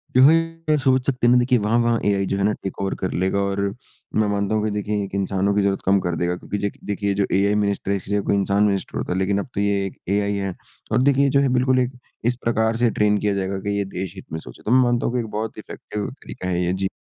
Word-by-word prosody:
जो 130 - +7
हैं 165 +1 +3
सोच 130 -2 +2
सकते 125 -3 +1
हैं - - +6
ना - - +6
देखिए 125 +1 +3
वहाँ-वहाँ 115 +2 +2
एआइ 100 -1 +2
जो - - 0
है 100 - 0
ना 105 - +3
टेक 95 - -5
ओवर 95 0 -1
कर 95 - -3
लेगा 95 +1 +1
और 100 0 -1 0.6
मैं 110 -1 +3
मानता 100 +1 0
हूँ 105 - +1
कि 110 - 0
देखिए 105 0 -1
एक 100 0 -6
इंसानों 100 0 0
की 105 - +3
ज़रूर 100 -1 +1
कम 100 +1 +4
कर 90 -2 -2
देगा, 85 +2 0
क्योंकि 105 - -5
देख 100 0 -3
देखिए 100 0 -1
जो 100 0 +1
एआई 100 +2 +3
मिनिस्टर 100 -1 0
है 100 - +2
इसकी 100 - -8
जगह 100 0 +2
कोई - - +3
इंसान 100 +1 +2
मिनिस्टर 100 -2 0
होता - - -2
लेकिन 95 +2 +1
अब - - -4
तो 100 - -1
ये 100 -1 +1
एक 95 - -7 0.2
एआई 100 0 +1
है, 95 -2 -3 0.4
और 115 +3 +3
देखिए 140 +1 +4
जो 140 - +3
है 140 -1 +2
बिल्कुल 130 +1 +3
एक 125 0 -2 0.3
इस 120 +1 +2
प्रकार 110 -1 +1
से 120 0 +3
ट्रेन 105 0 +2
किया 105 0 0
जाएगा 95 0 -2
की 100 0 0
ये 100 - 0
देश 95 -1 -4
हित 95 - -10
में 80 - -2
सोचे। 60 -6 -12
तो 110 - -1
मैं 130 +1 +6
मानता 120 -1 +1
हूँ - - -1
की - - +2
एक 115 - -3
बहुत 110 +1 -4
इफ़ेक्टिव 105 -1 -6
तरीका 95 - -7
है 90 0 0
ये, 90 - 0
जी। 95 +1 -1
100 Hz, 280 wpm, -22 LUFS, 100-120 Hz, 0.6 s, जो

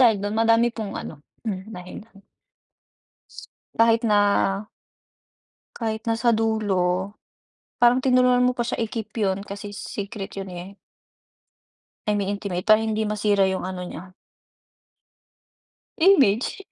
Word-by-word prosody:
dahil 225 -5 +5
dun 205 +2 -3
madami 230 +1 +4
pong 215 -3 -5
ano 145 -2 -8 0.2
mm 210 -1 -5
dahilan. 195 +3 -11 1.6
Kahit 230 0 +4
na, 210 -1 +4 1.6
Kahit 220 -2 -3
nasa 230 +1 +2
dulo 200 -4 0 0.7
parang 245 +1 +5
tinulungan 250 -1 +4
mo 250 - +3
pa 240 - +1
siya 235 - -2
i-keep 225 -1 -4
yun 195 -3 0
kasi 205 +1 -7
secret 200 0 -6
yun, 195 -1 -5
eh. 180 +2 -9 1.3
Ay 210 - +2
may 200 -1 -1
intimate 200 -3 -3
para 215 0 +7
hindi 220 -1 -1
masira 210 -1 +1
yung 185 -1 -3
ano 185 -1 -5
niya. 180 +1 -9 1.8
Image, 280 - +3
210 Hz, 120 wpm, -24 LUFS, 195-230 Hz, 1.8 s, para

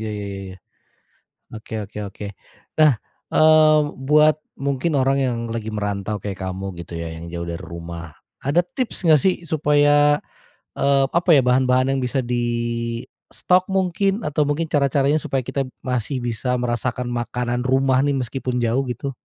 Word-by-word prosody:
Iya 110 - -4
iya 100 - -5
iya 100 - -6
iya. 95 0 -9 1.0
Oke 110 0 -11
oke 105 +1 -10
oke. 100 +1 -9 0.5
Nah, 155 -2 +7 0.4
eee, 155 -1 +6 0.3
buat 150 +1 +5 0.2
mungkin 140 +3 -1
orang 135 +1 +2
yang 125 -2 0 0.2
lagi 110 -1 -4
merantau 105 0 -2
kayak 100 -2 -5
kamu, 95 +1 -4
gitu 85 - -9
ya. 85 0 -4
Yang 80 +1 -8
jauh 85 - -4
dari 85 - -5
rumah. 85 -1 -8 0.3
Ada 145 +6 +3
tips 225 -4 -4
nggak 155 -3 +6
sih, 190 -1 +3
supaya, 145 -1 +4 0.6
eee, 140 0 +3
apa 170 +2 0
ya, 135 - +6
bahan-bahan 130 +1 +3
yang 135 - 0
bisa 130 +2 -1
distok, 120 +8 -1
mungkin. 195 +2 0
Atau 150 0 +1
mungkin 155 +2 -1
cara-caranya 140 0 +2
supaya 135 -2 -2
kita 135 +2 -2 0.2
masih 125 +1 -2
bisa 120 +2 -1
merasakan 125 0 -2
makanan 120 +1 -2
rumah, 130 0 +3
nih. 145 -1 +1
Meskipun 125 0 -3
jauh, 120 +4 +1
gitu? 125 +3 -4
130 Hz, 155 wpm, -22 LUFS, 115-145 Hz, 1.0 s, Nah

